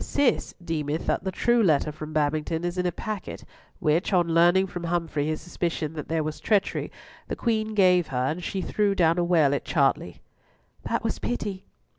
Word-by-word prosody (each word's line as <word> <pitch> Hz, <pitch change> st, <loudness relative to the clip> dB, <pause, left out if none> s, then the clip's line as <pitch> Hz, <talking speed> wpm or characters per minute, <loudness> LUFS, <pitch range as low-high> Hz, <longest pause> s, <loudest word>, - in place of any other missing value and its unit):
Cis 285 Hz, -3 st, 0 dB
deemeth 155 Hz, -1 st, -2 dB
that -, -, 0 dB
the 190 Hz, -, -1 dB
true 240 Hz, +5 st, +2 dB
letter 155 Hz, -6 st, +3 dB
from 155 Hz, +1 st, -8 dB
Babington 155 Hz, +2 st, 0 dB
is 175 Hz, +1 st, -2 dB
in 180 Hz, -, +1 dB
a -, -, 0 dB
packet 215 Hz, +1 st, -6 dB, 0.3 s
which, 160 Hz, +6 st, +1 dB
on 175 Hz, -3 st, +2 dB
learning 175 Hz, +3 st, +5 dB
from 175 Hz, -2 st, -6 dB
Humfrey 165 Hz, -4 st, -1 dB
his 155 Hz, 0 st, -2 dB
suspicion 170 Hz, -3 st, -3 dB
that 150 Hz, -2 st, -6 dB
there 160 Hz, -1 st, 0 dB
was 155 Hz, 0 st, -4 dB
treachery, 205 Hz, -2 st, 0 dB, 0.4 s
the -, -, -3 dB
Queen 220 Hz, -2 st, -1 dB
gave 180 Hz, -4 st, +4 dB
her, 125 Hz, -2 st, -1 dB
and 160 Hz, +6 st, -2 dB
she 190 Hz, +1 st, -3 dB
threw 205 Hz, -2 st, +1 dB
down 170 Hz, -1 st, +3 dB
a -, -, +2 dB
well 165 Hz, -5 st, +3 dB
at 140 Hz, -, -1 dB
Chartley." 135 Hz, -, 0 dB, 0.7 s
"That -, -, -1 dB
was -, -, -2 dB
pity." 185 Hz, -, -4 dB
170 Hz, 190 wpm, -26 LUFS, 155-190 Hz, 0.7 s, learning